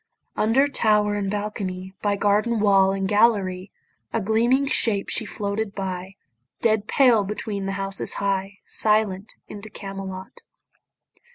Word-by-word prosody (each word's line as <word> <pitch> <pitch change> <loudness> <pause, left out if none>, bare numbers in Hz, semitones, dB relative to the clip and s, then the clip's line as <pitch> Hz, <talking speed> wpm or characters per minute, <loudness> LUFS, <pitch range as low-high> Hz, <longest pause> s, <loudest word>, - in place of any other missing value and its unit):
Under 240 +6 +3
tower 210 -6 +2
and 205 -1 -2
balcony, 190 -2 -4
By 205 -1 +1
garden 210 +3 +1
wall 195 -2 +4
and 195 0 -1
gallery, 205 -3 +2 0.4
A - - 0
gleaming 230 +6 +2
shape 225 -8 0
she 220 - -1
floated 205 0 -3
by, 185 -1 -5 0.4
Dead 215 -2 +1
pale 245 -6 +4
between 200 -1 -4
the 195 - -2
houses 195 0 0
high, 195 0 -2
Silent 210 -2 +1
into 210 +1 -9
Camelot. 195 - -8
205 Hz, 125 wpm, -23 LUFS, 195-220 Hz, 0.4 s, wall